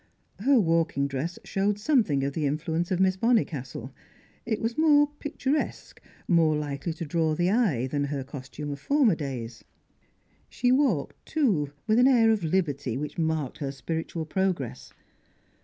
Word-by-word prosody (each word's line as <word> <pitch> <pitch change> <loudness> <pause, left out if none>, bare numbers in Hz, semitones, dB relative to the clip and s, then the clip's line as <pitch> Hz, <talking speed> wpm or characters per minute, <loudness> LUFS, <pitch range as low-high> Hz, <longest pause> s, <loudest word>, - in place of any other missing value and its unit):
Her 260 +4 +4
walking 165 -6 +1
dress 140 +6 -4
showed 200 +1 0
something 205 - +2
of 140 0 -1
the 150 -1 0
influence 160 +4 -1
of 185 - 0
Miss 190 0 +3
Bonnicastle; 150 - 0 0.6
it 220 -2 0
was 230 +1 -2
more 295 -2 +4
picturesque, 290 0 -3 0.3
more 165 -3 +4
likely 145 +2 -3
to 165 +1 -6
draw 160 0 0
the 175 +3 +1
eye, 195 - +2
than 145 +2 -1
her 140 -1 -3
costume 140 +2 -7
of 140 - -6
former 275 - +3
days. 125 -7 -5 0.9
She 245 0 +1
walked, 255 - +1
too, 200 - 0
with 220 +2 +3
an 250 - +6
air 230 -4 +5
of 215 -5 0
liberty 145 -8 -1
which 150 +4 -5
marked 160 -4 -1
her 140 -2 -3
spiritual 160 +3 -4
progress. 155 -8 -2
165 Hz, 155 wpm, -27 LUFS, 140-220 Hz, 0.9 s, an